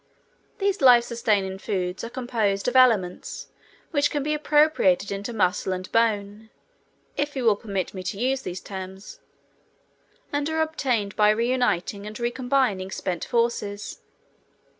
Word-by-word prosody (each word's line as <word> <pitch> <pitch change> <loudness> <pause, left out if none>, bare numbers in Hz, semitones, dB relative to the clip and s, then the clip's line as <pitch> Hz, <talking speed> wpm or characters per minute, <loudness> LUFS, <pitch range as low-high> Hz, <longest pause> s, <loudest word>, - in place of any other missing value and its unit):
These 395 -2 0
life 245 -3 +7
sustaining 205 -5 0
foods 185 -2 -3
are 230 - -4
composed 230 -6 -1
of 250 - 0
elements 220 -9 +2 0.4
which 290 -2 +2
can 290 -2 -2
be 300 +1 0
appropriated 295 - +3
into 200 +3 -4
muscle 190 -3 0
and 185 0 -6
bone 215 -1 0 0.7
(if 290 0 -1
you 260 - -2
will 220 -2 +5
permit 195 -3 -4
me 190 - -6
to 195 +1 -3
use 260 +4 0
these 180 -4 -6
terms), 190 - -8 1.1
and 290 +1 0
are 320 0 +1
obtained 250 -10 -1
by 210 -1 +5
reuniting 215 -4 0
and 215 +1 -8
re 240 0 0
combining 245 -7 0
spent 180 -3 -3
forces. 230 -4 -1
220 Hz, 140 wpm, -25 LUFS, 195-255 Hz, 1.1 s, life